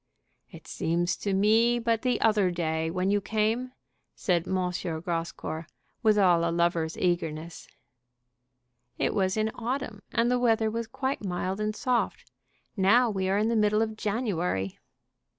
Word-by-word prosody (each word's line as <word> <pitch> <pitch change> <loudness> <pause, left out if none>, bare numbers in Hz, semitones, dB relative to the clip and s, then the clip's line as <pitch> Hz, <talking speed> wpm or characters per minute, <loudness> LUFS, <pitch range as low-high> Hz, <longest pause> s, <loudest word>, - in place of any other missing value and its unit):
"It - - -13
seems 175 +2 -1
to 200 - -2
me 220 +5 +4
but 230 -1 0
the 250 -1 +1
other 210 -4 +3
day 160 -2 -1
when 185 +3 0
you 205 0 +2
came." 220 +5 -1 0.4
said 175 -2 0
M. - - -2 0.2
Grascour, 165 -2 -4 0.3
with 215 -3 +4
all 175 -4 +4
a 170 - +1
lover's 170 -1 0
eagerness. 165 -2 -2 1.3
"It - - 0
was 190 0 +1
in 215 0 +1
autumn, 235 -3 -4
and 235 +1 +2
the 250 - +2
weather 225 -2 +2
was 230 0 -3
quite 265 +1 -3
mild 185 +1 -2
and 215 0 -1
soft. 250 0 -1 0.4
Now 225 +5 +4
we 190 -2 -1
are 195 - +2
in 215 +2 +1
the 230 - +1
middle 210 0 +3
of 220 -1 -4
January." 190 - -2
205 Hz, 150 wpm, -27 LUFS, 175-225 Hz, 1.3 s, me